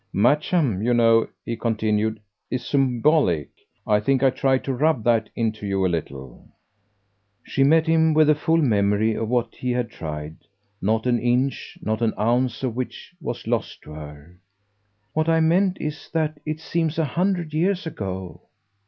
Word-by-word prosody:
Matcham, 145 - +2
you 120 +1 +2
know," 115 -1 +4 0.2
he 115 - -3
continued, 110 -1 0 0.3
"is 125 -1 -3
symbolic. 130 - +2 0.4
I 105 -1 +3
think 135 +5 +1
I 135 - +5
tried 130 0 +1
to 135 - -2
rub 140 -2 +1
that 115 -2 +2
into 110 -2 -2
you 95 -1 0
a - - +2
little." 70 -6 -6 1.0
She 135 - 0
met 160 +3 +4
him 160 -1 +3
with 155 0 +6
the 155 - +5
full 160 +2 +1
memory 110 -5 +2
of 110 0 -3
what 120 -2 0
he 125 - -4
had 125 -1 -1
tried 75 -1 -6 0.4
not 110 +4 0
an 120 -1 +2
inch, 125 +3 -1
not 110 +1 -1
an 115 -2 +1
ounce 120 +3 0
of 125 -4 -1
which 130 +7 -6
was 120 -5 -5
lost 115 -1 -2
to - - -12
her. 75 +3 -11 0.7
"What 155 +1 +1
I 165 0 +4
meant 180 +4 +2
is 150 0 -5
that 155 -2 -1
it 155 0 -2
seems 165 -1 -2
a 160 - +2
hundred 175 +1 -1
years 180 +4 0
ago." 95 - -6
120 Hz, 170 wpm, -23 LUFS, 105-155 Hz, 1.0 s, with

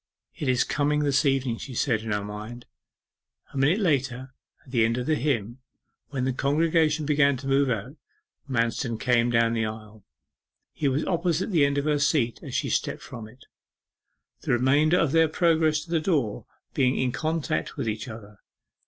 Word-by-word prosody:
'It 145 - -5
is 125 -1 +3
coming 150 +1 0
this 140 -1 +2
evening,' 130 -4 0
she 130 - -8
said 115 -3 +1
in 110 -1 -5
her 105 -1 -1
mind. 105 +4 -8 0.9
A - - -6
minute 150 +8 +3
later, 135 - -1 0.3
at 130 - -15
the 120 -4 +3
end 115 +1 +1
of 125 - -2
the 155 - +1
hymn, 125 -6 -1 0.5
when 135 -3 -2
the 130 - 0
congregation 155 +2 +1
began 140 -2 +3
to 135 - -10
move 135 0 +2
out, 125 +6 -3 0.5
Manston 115 -1 -1
came 120 -1 +2
down 115 -1 +2
the 115 -1 0
aisle. 110 -1 -9 0.7
He 145 - -1
was 135 +3 0
opposite 175 +2 0
the 160 -6 +4
end 140 0 -2
of 140 - 0
her 150 -1 +1
seat 140 -5 +1
as - - -7
she - - 0
stepped - - -2
from 115 -3 -9
it, 125 +4 -18 1.0
the - - -1
remainder 145 +7 +3
of 165 -6 +2
their 165 +1 +4
progress 160 -1 +2
to 170 - -13
the 165 - +2
door 145 - -1 0.3
being 130 -1 +2
in 130 -1 0
contact 160 +2 -2
with - - -3
each 110 +3 -3
other. 105 -3 -11
135 Hz, 185 wpm, -26 LUFS, 115-150 Hz, 1.0 s, the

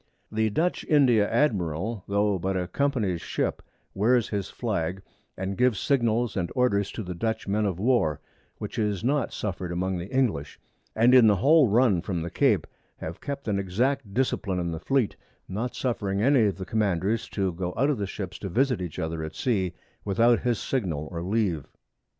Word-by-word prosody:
The 110 0 +1
Dutch 165 - 0
India 125 -9 +4
Admiral, 100 - 0
tho' 100 -1 +1
but 95 +2 -1
a 90 -1 -2
Company's 105 - 0
Ship, - - -2 0.3
wears 115 +3 +2
his 100 -2 -3
Flag, 95 -5 -2 0.3
and 95 +1 -3
gives 125 -3 +2
Signals 120 -4 +1
and 85 -3 -2
Orders 100 -6 +2
to 110 - -4
the 90 -1 -5
Dutch 110 +6 -2
Men 105 +1 +1
of 95 -4 -2
War, 95 - +2 0.4
which - - -5
is 105 -2 -1
not 135 +1 +1
suffer'd 90 -3 -4
among 90 +1 -1
the 90 +3 -6
English, 120 - 0 0.4
and 115 +3 +5
in 125 -3 +8
the 105 - +5
whole 145 - +5
Run 110 -4 +3
from 90 -3 -3
the 85 - -5
Cape - - +2 0.3
have 80 +2 -7
kept 140 -3 -5
an 100 -2 +1
exact 115 +5 -1
Discipline 105 -5 0
in 85 -1 -2
the 80 - -4
Fleet, 135 -1 +1 0.3
not 110 +6 -3
suffering 100 -6 -1
any 125 +1 +4
of 100 - -2
the 95 - -5
Commanders 105 +1 0
to 95 -3 -1
go 90 +1 -3
out 140 +5 +3
of 135 - -2
the 100 - -2
Ships 95 -1 -6
to 95 - -5
visit 125 +2 +1
each 90 -4 -5
other 80 0 -3
at 80 - -6
Sea 95 -8 0 0.3
without 115 +4 +3
his 120 -2 0
Signal 85 - -2
or 85 -2 -4
Leave. 95 - -1
105 Hz, 185 wpm, -26 LUFS, 90-120 Hz, 0.4 s, in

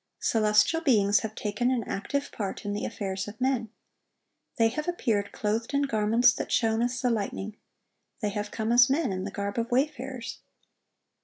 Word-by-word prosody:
Celestial 215 +9 +3
beings 205 -9 +4
have 220 -1 -5
taken 210 +4 -1
an 250 -3 0
active 280 +9 -3
part 200 -2 -5
in 205 - -2
the 205 - -2
affairs 195 -3 -4
of 210 +1 -9
men. 255 -3 0 0.9
They 225 -1 +4
have 305 +8 -4
appeared 225 -12 0
clothed 225 +5 -2
in 285 - +3
garments 230 0 +3
that - - -5
shone 225 -1 +2
as 245 +1 0
the 250 -1 +1
lightning; 210 -1 -3 0.6
they 210 -4 -1
have 205 0 -3
come 220 +1 -2
as 240 +1 +6
men, 275 -3 +1
in 185 0 -3
the - - -3
garb 200 +2 -3
of 230 +1 -2
wayfarers. 260 -2 -2
225 Hz, 175 wpm, -27 LUFS, 210-250 Hz, 0.9 s, as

